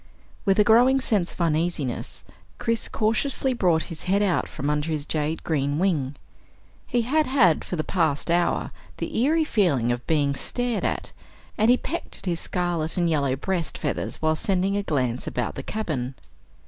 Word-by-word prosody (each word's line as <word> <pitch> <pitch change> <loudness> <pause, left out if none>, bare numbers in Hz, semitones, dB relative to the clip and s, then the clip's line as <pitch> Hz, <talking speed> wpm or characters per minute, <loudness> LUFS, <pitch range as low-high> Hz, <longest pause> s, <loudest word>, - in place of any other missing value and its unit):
With 195 -2 +3
a 210 - +6
growing 245 +5 +5
sense 205 -8 +1
of - - -14
uneasiness, 160 -5 -1 0.3
Chris 230 -1 -1
cautiously 255 +4 0
brought 175 -8 +2
his 155 - -8
head 200 +3 +2
out 190 -4 +1
from 140 - -5
under 150 +1 0
his 150 -2 -2
jade 155 +1 -1
green 145 -2 0
wing. 155 -7 0 0.7
He 240 -1 +1
had 300 +6 +2
had 215 - +4
for - - -4
the 155 - -1
past 160 -3 0
hour 175 0 +1 0.3
the - - -4
eerie 310 +7 +3
feeling 165 - +2
of 120 0 -4
being 145 -3 +2
stared 245 - -1
at, - - -2 0.4
and 220 +2 +3
he 250 - +6
pecked 340 - -5
at - - -11
his 170 -3 -1
scarlet 175 -3 -2
and 175 -1 +2
yellow 140 -4 +1
breast 170 +3 -2
feathers - - -2
while 155 0 +3
sending 190 +3 +1
a 205 - +1
glance 130 -9 -1
about 120 -2 -2
the - - -5
cabin. 140 - -3
175 Hz, 175 wpm, -25 LUFS, 150-215 Hz, 0.7 s, a